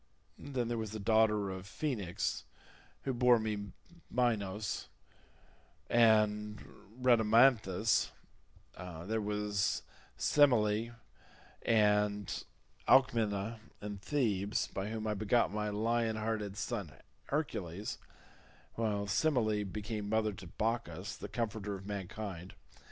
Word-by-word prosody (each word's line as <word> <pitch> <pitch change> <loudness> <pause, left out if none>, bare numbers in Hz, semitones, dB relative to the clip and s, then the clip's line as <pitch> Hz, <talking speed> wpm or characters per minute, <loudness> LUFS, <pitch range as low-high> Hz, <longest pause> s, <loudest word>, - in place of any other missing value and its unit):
Then 130 -4 -2
there 120 -1 -1
was 110 -1 -4
the 110 - -4
daughter 105 -1 +3
of 95 0 -7
Phoenix, 105 - -2 0.6
who 135 - -1
bore 125 0 +5
me 105 -2 -3 0.4
Minos 105 -5 -1 1.0
and 105 -2 +4 0.4
Rhadamanthus: 115 -4 +4 0.7
there 90 +5 -4
was 105 -1 0 0.3
Semele, 115 -5 +3 0.7
and 105 -2 +2 0.4
Alcmena 115 -4 +3 0.2
in 105 -1 -6
Thebes 105 -5 0
by 95 +2 -3
whom 110 0 -4
I 105 - 0
begot 105 +1 +2
my 105 0 -1
lion 115 +2 0
hearted 110 -2 -2
son 105 - -3 0.3
Hercules, 100 - -3 0.7
while 105 -3 -1
Semele 110 -1 +2
became 105 +1 -4
mother 110 -1 +1
to 95 - -10
Bacchus 105 -1 -2
the - - -8
comforter 105 -3 -3
of 95 0 -9
mankind. 100 -2 -6
105 Hz, 100 wpm, -33 LUFS, 100-115 Hz, 1.0 s, bore